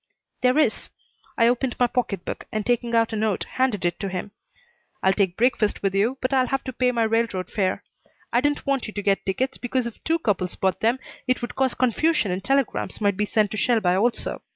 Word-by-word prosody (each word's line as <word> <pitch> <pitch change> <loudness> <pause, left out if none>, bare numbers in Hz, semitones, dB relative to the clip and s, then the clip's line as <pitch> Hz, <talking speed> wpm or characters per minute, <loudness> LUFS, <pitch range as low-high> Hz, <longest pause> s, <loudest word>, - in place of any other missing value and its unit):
"There 255 +2 +3
is." 310 - +2 0.5
I 230 - +5
opened 245 +1 +1
my 245 - +5
pocket 225 -7 -2
book, - - -5
and, 215 -1 -2
taking 240 -1 0
out 225 0 +2
a - - 0
note, 215 -2 0
handed 255 -8 -1
it 175 0 0
to 195 - -3
him. 190 +2 -5 0.7
"I'll 190 - +4
take 190 -3 0
breakfast 230 -4 +1
with 195 -1 +1
you 220 +7 +1
but 255 +1 0
I'll 260 -1 +3
have 270 +1 -1
to 260 - -5
pay 250 +1 +2
my 235 -2 +1
railroad 220 -4 0
fare. 190 -3 0 0.5
I 240 - +4
didn't 290 +1 0
want 275 -3 0
you 215 - -8
to 205 - -4
get 195 -1 +2
tickets, 260 +7 -1
because 250 0 -1
if 235 - -8
two 325 +1 +2
couples 200 - -1
bought 190 -1 0
them 230 +3 +2 0.3
it 255 -1 0
would 240 - -4
cause 265 -2 +1
confusion 255 - +2
and 185 +1 -3
telegrams 270 +2 0
might 205 -2 +2
be 210 - 0
sent 210 -1 +1
to 215 - -4
Shelby 220 -4 +2
also. 205 +7 0
230 Hz, 225 wpm, -24 LUFS, 200-255 Hz, 0.7 s, I